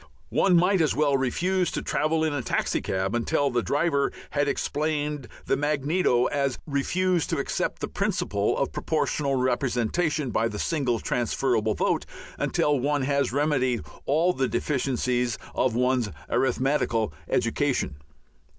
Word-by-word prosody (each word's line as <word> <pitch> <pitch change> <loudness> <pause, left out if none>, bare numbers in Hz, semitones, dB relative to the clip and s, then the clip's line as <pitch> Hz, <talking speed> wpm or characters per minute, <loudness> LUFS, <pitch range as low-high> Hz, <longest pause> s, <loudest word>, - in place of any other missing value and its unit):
One 185 -2 +3
might 180 +2 +4
as 155 - +2
well 145 -2 +3
refuse 175 +8 +1
to - - -2
travel 160 +1 +1
in 155 -2 +1
a 145 - -1
taxicab 95 -4 -1
until 140 +4 +1
the 120 0 +1
driver 140 +1 +1 0.2
had 145 0 +1
explained 150 -2 -1 0.2
the - - +2
magneto 145 -2 +1
as 140 -2 0
refuse 175 +4 0
to - - -1
accept - - -2
the - - -1
principle - - -1
of - - 0
Proportional 140 -2 -1
Representation 130 +3 0
by 115 - +1
the 105 -2 -5
single 130 -3 0
transferable 115 -2 0
vote - - 0 0.3
until 145 -2 +1
one 145 +1 0
had 140 -1 +1
remedied 130 - +1 0.2
all 165 +6 +3
the 135 -3 0
deficiencies 125 -4 0 0.2
of 125 -3 +1
one's 125 -2 +1 0.2
arithmetical 130 - +1 0.2
education. 75 - 0
140 Hz, 135 wpm, -26 LUFS, 125-150 Hz, 0.3 s, might